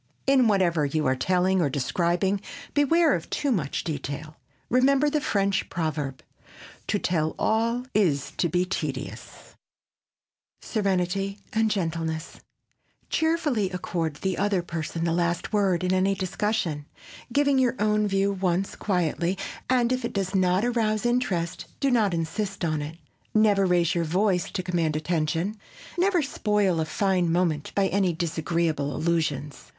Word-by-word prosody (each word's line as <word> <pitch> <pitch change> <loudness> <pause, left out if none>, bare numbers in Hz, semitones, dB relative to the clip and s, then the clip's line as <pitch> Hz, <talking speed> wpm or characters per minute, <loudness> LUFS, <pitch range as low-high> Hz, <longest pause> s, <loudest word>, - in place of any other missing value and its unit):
In 270 -3 +4
whatever 180 -6 +2
you 150 +2 0
are 130 0 +2
telling 185 +5 +2
or 150 - +2
describing, 175 +8 0 0.3
beware 310 +3 +4
of 170 - -3
too 285 - 0
much 165 - -1
detail. 150 0 -5 0.3
Remember 275 +4 +3
the 300 0 +1
French 200 -5 0
proverb, 150 -5 -3 0.6
"To 210 - +1
tell 160 -5 0
all 230 +3 +1
is 155 -10 +1
to 170 - +1
be 180 +3 +1
tedious." 145 -7 -5 1.1
[Sidenote: - - -22 0.5
SERENITY 195 +1 -3
AND 220 0 +2
GENTLENESS] 165 -5 -3 0.7
Cheerfully 310 - +1
accord 170 -3 -3
the 190 +3 -2
other 200 -3 +1
person 165 -1 -4
the 165 -1 +1
last 170 +3 -1
word 195 -4 +2
in 180 0 +1
any 190 +1 +2
discussion, 185 -5 -2 0.4
giving 280 +1 +3
your 255 -1 +2
own 210 0 +2
view 195 0 +1
once 190 -1 -1
quietly 180 -1 0 0.3
and 250 -2 +3
if 255 0 -2
it 235 - -3
does 195 -1 -2
not 185 +2 +2
arouse 225 -2 0
interest, 205 -9 0
do 275 -1 +2
not 220 -5 +3
insist 190 +3 -2
on 155 -2 0
it. 155 +3 -6 0.4
Never 205 -3 +4
raise 175 -1 +2
your 170 -2 0
voice 180 +2 +1
to 185 - -3
command 170 -4 0
attention. 165 +5 -1 0.4
Never 360 -2 +2
spoil 210 -9 +1
a 160 - +1
fine 180 0 +1
moment 165 -4 0
by 200 - +3
any 190 -2 +1
disagreeable 160 -2 -1
allusions. 155 -4 -2
185 Hz, 145 wpm, -26 LUFS, 165-210 Hz, 1.1 s, In